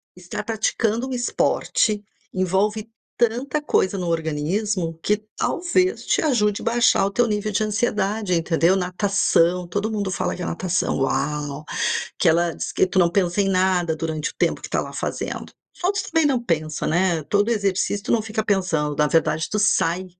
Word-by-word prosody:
estar 180 -1 -6
praticando 225 +2 0
um - - -4
esporte, 230 -3 +1 0.3
envolve 200 +4 0 0.3
tanta 245 +5 0
coisa 195 -9 +1
no 180 - -3
organismo 165 +3 -1
que 210 - +2 0.2
talvez 365 +2 0
te - - +2
ajude 210 -9 +1
a - - -9
baixar 235 -3 +3
o 200 - -1
teu 240 +3 +2
nível 210 0 -1
de 210 +2 +1
ansiedade, 210 -2 0
entendeu? 165 +1 +2
Natação, 180 -2 +1
todo 205 +4 -2
mundo 205 -3 -2
fala 180 -1 -2
que - - -8
a - - -2
natação, 180 +1 -1
"uau!", 145 +1 -1 0.6
que - - +3
ela 170 +1 +3
diz - - -4
que - - +3
tu 185 - -1
não 170 -2 +4
pensa 180 0 +1
em 195 - +2
nada 185 -3 +1
durante 160 -1 -3
o - - -17
tempo - - 0
que - - -7
está - - 0
lá - - -8
fazendo. - - -4 0.4
Outros 400 +3 0
também 325 -2 +2
não 265 -4 +1
pensam, 155 -5 -1
né. 175 -1 +1
Todo 205 +8 +1
exercício 200 -1 0
tu - - 0
não 235 - +3
fica 220 0 -3
pensando, 175 -8 0
na 150 - +3
verdade 155 0 +1
tu 210 - -1
sai, 185 -3 +2
190 Hz, 180 wpm, -22 LUFS, 170-215 Hz, 0.6 s, não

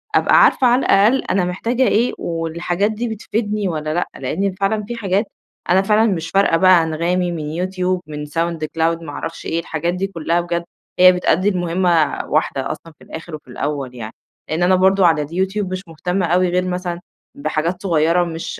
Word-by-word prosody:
أبقى - - +5
عارفة 260 - +4
على 245 +1 +4
الأقل 215 +7 +4
أنا 185 -1 0
محتاجة 230 +8 -1
إيه 230 +4 +2
والحاجات 170 +4 -2
دي 230 +3 -3
بتفيدني 215 -1 -2
والّا 155 -3 -3
لأ. 175 - -1
لإنّي 190 +9 -1
فعلًا 210 +2 0
في 240 - -4
حاجات 200 -1 0 0.4
أنا 185 +2 +5
فعلًا 215 +2 +3
مش 165 -3 -3
فارقة 195 -4 +3
بقى 185 -1 +5
أنغامي 175 +3 -1
من 170 - -4
يوتيوب 185 +2 -2
من 150 -1 -6
sound 165 +3 -2 0.2
cloud 165 +1 +1
ما 160 - -8
أعرفش 165 +3 -6
إيه، 165 - -1
الحاجات 170 +1 -2
دي 190 +2 -2
كُلّها 170 -2 -1
بجد، 170 0 -2 0.4
هي 185 0 +9
بتؤدّي 180 +1 +1
المهمة 175 -4 +1
واحدة 145 -3 -1
أصلًا 165 - -9
في - - -16
الآخِر 160 0 -8
وفي 150 - -13
الأول 135 0 -4
يعني. 110 -2 -7 0.4
لإن 160 +3 0
أنا 185 +1 +4
برضه 190 +1 +4
على 160 -2 +2
اليوتيوب 190 +5 -2
مش 185 0 -3
مهتمة 180 +3 -2
أوي 180 +2 +2
غير 180 +1 0
مثلًا 180 -1 -3 0.4
بحاجات 175 - -2
صغيرة 170 -1 +2
ومش 165 -1 -4
180 Hz, 185 wpm, -19 LUFS, 165-195 Hz, 0.4 s, هي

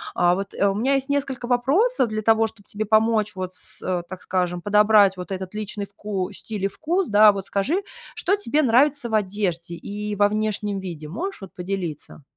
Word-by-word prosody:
А 175 0 +4
вот, 195 +1 -4
э, 200 - +1
у 195 - +1
меня 260 +7 +1
есть 270 +1 -1
несколько 275 -3 -1
вопросов 270 - +2
для 215 0 -3
того, 225 0 +4
чтобы 215 -2 -12
тебе 215 +1 -3
помочь 215 0 +2
вот 185 0 -5
с, - - -11
э, 180 -1 0
так 185 -1 -8
скажем, 180 -1 -1
подобрать 210 -1 +5
вот 180 +1 -8
этот 190 +1 -5
личный 210 -1 -4
вку 200 -1 -4
стиль 200 0 -4
и - - +4
вкус, 335 - -1
да. 210 0 +7
Вот 195 -1 -5
скажи, 295 - 0 0.3
что 395 - +1
тебе 310 -7 0
нравится 265 +1 +3
в - - -7
одежде 185 -4 -1
и 205 +3 -5
во 205 0 +4
внешнем 210 -1 -1
виде, 165 -5 -7
можешь, 370 - -5
вот, 190 - -10
поделиться? 180 -6 -5
210 Hz, 200 wpm, -23 LUFS, 190-230 Hz, 0.3 s, да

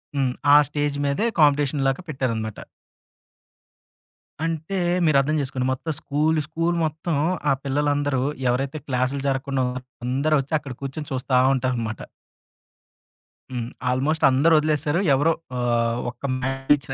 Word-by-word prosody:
హ్మ్. 135 -2 +1 0.2
ఆ - - +9
స్టేజ్ 145 -1 -1
మీదే 140 +11 0 0.2
కాంపిటీషన్ 145 -1 +3
లాగా 135 +6 0
పెట్టేరనమాట. 115 -7 -3 1.9
అంటే 165 +4 -3 0.3
మీరర్థం 150 0 +3
చేసుకోండి. 130 -2 -2
మొత్తం 160 +5 -4
స్కూలు 155 +2 +1
స్కూలు 165 +2 -1
మొత్తం, 155 +1 -2 0.3
ఆ - - +5
పిల్లలందరూ 145 -1 0 0.3
ఎవరైతే 135 +4 -1
క్లాసులు 130 +1 0
జరగకుండా 135 0 0 0.4
అందరూ 140 +5 +1
వచ్చి, 135 +4 -9
అక్కడ 135 -4 -8
కూర్చొని 150 +3 -5
చూస్తా 130 0 -1 0.2
ఉంటారనమాట. 120 -4 -2 1.5
హ్మ్. 120 -2 -4 0.2
ఆల్మోస్ట్ 140 +5 0
అందరూ 145 +6 +4
వదిలేసారు. 150 +2 0
ఎవరో 145 +5 +3 0.2
ఆహ్, 120 -1 +1
ఒక్క 125 - -29
మ్యాథ్స్ 135 +1 -4
టీచర్ 135 -2 +3
140 Hz, 120 wpm, -23 LUFS, 130-150 Hz, 1.9 s, ఆ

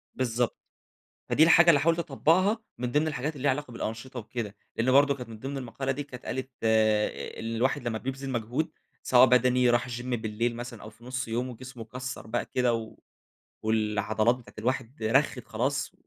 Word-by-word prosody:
بالضبط، 120 -2 0 0.7
فدي 155 - +4
الحاجة 170 +1 +7
اللي 145 -4 +5
حاولت 165 +3 +2
أطبقها 170 - +2 0.2
من 125 0 -3
ضمن 150 +3 +2
الحاجات 150 0 -2
اللي 130 - -8
ليها 145 - +4
علاقة 130 -1 -3
بالأنشطة 115 +3 -5
وكده. 105 -2 -5 0.2
لأن 125 +3 +2
برضه 140 +1 +5
كانت 125 -4 -8
من 110 -1 -9
ضمن 135 +4 -4
المقالة 135 +1 -3
دي 145 +2 -4
كانت 130 -3 -11
قالت 130 +1 -3
إن 110 -1 +1
الواحد 120 0 +1
لمّا 110 -1 -2
بيبذل 135 +2 -5
مجهود 125 +6 -1 0.3
سواء 125 0 +6
بدني، 125 0 +4
راح 120 +1 +2
الgym 120 0 -5
بالليل 115 -1 -1
مثلًا 120 -2 -7
أو 110 - -9
في 115 +2 -20
نص 130 0 -3
يومه 120 +3 -1
وجسمه 125 0 -9
كَسّر 125 +2 -6
بقى 110 - -2
كده 125 -2 +1
و 115 -1 -5 0.7
والعضلات 110 +1 +2
بتاعة 125 -1 -15
الواحد 125 +2 -2
رَخِّت 125 +3 +2
خلاص، 130 +6 -1
125 Hz, 180 wpm, -28 LUFS, 115-135 Hz, 0.7 s, الحاجة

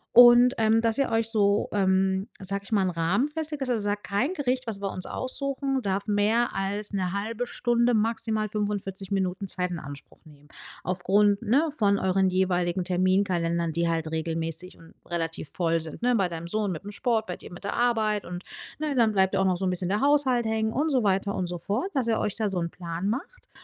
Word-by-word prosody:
Und, 245 +1 +8
ähm, 220 0 +4
dass 225 -1 +2
ihr 275 - +2
euch 225 0 +1
so, 205 -2 +2
ähm, 190 0 +2
sage 195 +1 -3
ich 200 - -14
mal, 205 -3 +3
'n 185 - 0
Rahmen 175 - +1
festlegt, 300 -1 -4
dass 260 - -4
ihr 240 -2 +1
sagt: 205 0 -2
„Kein 205 - 0
Gericht, 260 -5 -1
was 215 -3 -4
wir 200 -1 -2
uns 185 - -5
aussuchen, 270 +1 -2
darf 200 -1 -2
mehr 215 +3 +2
als 205 +2 -3
'ne 185 -2 -1
halbe 225 +4 -3
Stunde, 240 0 +1
maximal 220 0 0
45 200 -2 -3
Minuten 190 0 -1
Zeit 180 0 -1
in 170 - -4
Anspruch 145 -1 -10
nehmen.” 145 -2 -18 0.4
Aufgrund, 200 +3 +2
ne, 255 +8 +2
von 200 -6 +3
euren 190 0 +2
jeweiligen 180 -1 +1
Terminkalendern, 175 -3 +1
die 170 +1 0
halt 165 -1 -1
regelmäßig 165 +2 -2
und 165 - -17
relativ 165 -3 -3
voll 165 -2 0
sind, 160 +6 -6
ne? 245 0 +3
Bei 195 -5 +1
deinem 170 0 -6
Sohn 210 +1 0
mit 160 - -6
'm 205 - -6
Sport, 220 +1 0
bei 180 - -5
dir - - -13
mit 175 - -11
der 200 - -2
Arbeit 220 -4 +1
und, 180 +1 -6 0.4
ne, 305 -1 -1
dann 230 -3 +4
bleibt 190 -1 +2
ja 195 - +2
auch - - +2
noch 185 -1 +2
so 190 - -2
'n - - +2
bisschen 180 0 -1
der 205 +2 +1
Haushalt 275 -4 +3
hängen 220 0 0
und 300 +4 0
so 260 -3 +3
weiter 200 0 +1
und 180 - -2
so 175 0 -4
fort, 205 - -2
dass 260 -4 +1
ihr 225 - +1
euch 210 - -1
da 220 -2 0
so 195 -3 -1
'n 170 -1 -2
Plan 170 +2 -4
macht. 270 - -5
200 Hz, 220 wpm, -26 LUFS, 180-230 Hz, 0.4 s, Und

